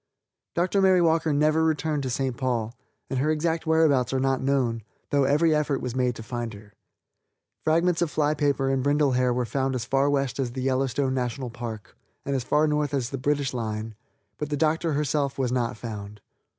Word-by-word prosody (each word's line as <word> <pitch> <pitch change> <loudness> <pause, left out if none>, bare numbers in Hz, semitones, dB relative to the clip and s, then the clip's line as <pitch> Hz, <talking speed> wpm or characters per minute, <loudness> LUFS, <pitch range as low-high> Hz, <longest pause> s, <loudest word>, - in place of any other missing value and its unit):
Dr. 185 +3 +2
Mary 190 -1 +5
Walker 165 -2 +2
never 155 +2 +3
returned 155 -1 0
to 130 - -3
St. 130 0 -1
Paul, 120 -3 -2 0.3
and 135 - -2
her 150 +4 +1
exact 160 +1 0
whereabouts 155 -6 +3
are 135 - 0
not 135 0 +1
known, 130 -4 0 0.3
though 140 -1 +3
every 150 +4 +3
effort 150 -2 +1
was 125 -1 -4
made 125 -2 +1
to 115 - -8
find 120 -1 -4
her. 100 0 -15 0.9
Fragments 170 +2 +2
of 170 - +1
fly 150 0 +1
paper 140 -3 +1
and 135 -1 +1
brindle 145 +1 +2
hair 125 0 +2
were 125 0 0
found 135 +1 -1
as 120 -2 -3
far 135 +3 +2
west 140 -2 0
as 125 -3 -1
the 130 0 -4
Yellowstone 130 0 0
National 125 0 -3
Park, 115 -2 -7 0.3
and 140 - -1
as 130 - -1
far 150 +4 +2
north 150 -1 0
as 130 -2 -2
the 135 - -4
British 140 0 0
line, 110 -2 -3 0.5
but 150 - -3
the 145 - -1
Doctor 160 +2 +1
herself 145 -1 0
was 130 -3 0
not 120 -3 -1
found. 105 -3 -7
135 Hz, 200 wpm, -26 LUFS, 125-150 Hz, 0.9 s, Mary